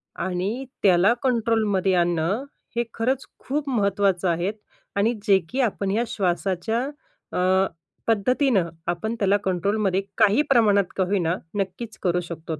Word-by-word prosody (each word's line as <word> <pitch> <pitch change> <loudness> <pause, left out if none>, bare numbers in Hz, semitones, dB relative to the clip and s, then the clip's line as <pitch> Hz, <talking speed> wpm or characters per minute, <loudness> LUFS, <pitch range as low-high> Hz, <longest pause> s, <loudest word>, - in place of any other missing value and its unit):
आणि 190 +8 -2 0.2
त्याला 190 +2 +5
कंट्रोलमध्ये 220 -6 +1
आणणं, 175 +6 +1 0.3
हे 235 - +2
खरंच 255 +3 -1
खूप 285 +1 -3
महत्त्वाचं 200 -5 +1
आहे 175 +3 0 0.4
आणि 210 +4 +2
जे 195 -1 +6
की 270 - -3
आपण 200 -5 0
ह्या 225 +4 +1
श्वासाच्या, 190 +2 -1 0.6
अ, 185 +1 +3 0.4
पद्धतीनं 225 - +2 0.2
आपण 220 +7 -3
त्याला 200 0 +3
कंट्रोलमध्ये 195 +1 +1 0.2
काही 215 +4 +5
प्रमाणात 215 -6 +5
का 190 - +2
होईना, 180 -4 +1 0.2
नक्कीच 205 +3 -4
करू 180 -1 +2
शकतो. 165 -2 -6
200 Hz, 130 wpm, -24 LUFS, 180-225 Hz, 0.6 s, जे